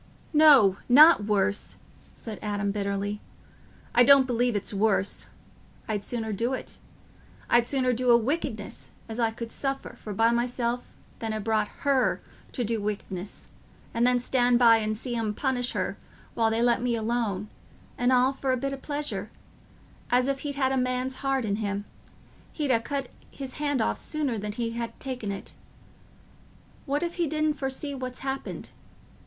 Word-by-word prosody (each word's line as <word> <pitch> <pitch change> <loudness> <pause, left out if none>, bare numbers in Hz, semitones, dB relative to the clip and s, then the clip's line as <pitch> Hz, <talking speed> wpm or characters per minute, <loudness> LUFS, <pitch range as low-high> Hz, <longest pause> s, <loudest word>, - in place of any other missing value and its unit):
"No—not 285 - +7
worse," 205 -1 0 0.4
said 220 -3 -7
Adam, 205 -1 -1
bitterly; 200 0 -2 0.7
"I 245 - +6
don't 275 +1 +7
believe 245 -2 +1
it's 205 +2 -3
worse—I'd 205 +1 -2
sooner 220 -1 -3
do 235 +6 -1
it—I'd 240 -2 -3
sooner 255 -2 +1
do 250 +1 0
a 235 - +8
wickedness 235 -4 -3 0.2
as 225 +1 -6
I 230 -1 +3
could 230 +1 -7
suffer 270 -1 -3
for 215 - -6
by 225 +3 +3
myself 240 0 -1 0.3
than 225 -1 -3
ha' 215 -1 -3
brought 215 -1 +1 0.2
her 275 -2 +2 0.3
to 250 - -2
do 225 -1 -1
wickedness 200 -2 -5 0.5
and 235 +1 +3
then 250 0 +4
stand 245 0 +2
by 230 -2 +7
and 215 -1 -1
see 240 +1 -4
'em 220 -2 -1
punish 250 -2 -1
her - - -2 0.4
while 225 -1 +2
they 225 +1 +1
let 240 -1 +3
me 245 -1 0
alone; 220 -3 -1 0.5
and 245 +1 +1
all 255 +1 +4
for 270 0 -1
a 255 - +1
bit 275 +2 -2
o' - - -4
pleasure, 290 +2 -4 0.8
as, 250 +1 +3
if 275 -1 -1
he'd 285 -1 -4
had 265 -2 +1
a 265 - +1
man's 255 +1 -1
heart 270 -3 0
in 200 -1 -1
him, 205 -1 -3 0.7
he'd 295 -4 -1
ha' 230 -2 +2
cut 275 -2 -3 0.2
his 270 -2 -8
hand 285 -4 +1
off - - -1
sooner 285 -8 -2
than 210 0 -4
he'd 230 +1 -3
ha' 230 -1 -4
taken 250 -6 -4
it. 195 - -6 1.3
What 285 +4 0
if 340 0 -2
he 335 - +2
didn't 310 0 +1
foresee 275 +1 -3
what's 255 -2 -6
happened? 270 0 -4
240 Hz, 165 wpm, -27 LUFS, 215-265 Hz, 1.3 s, a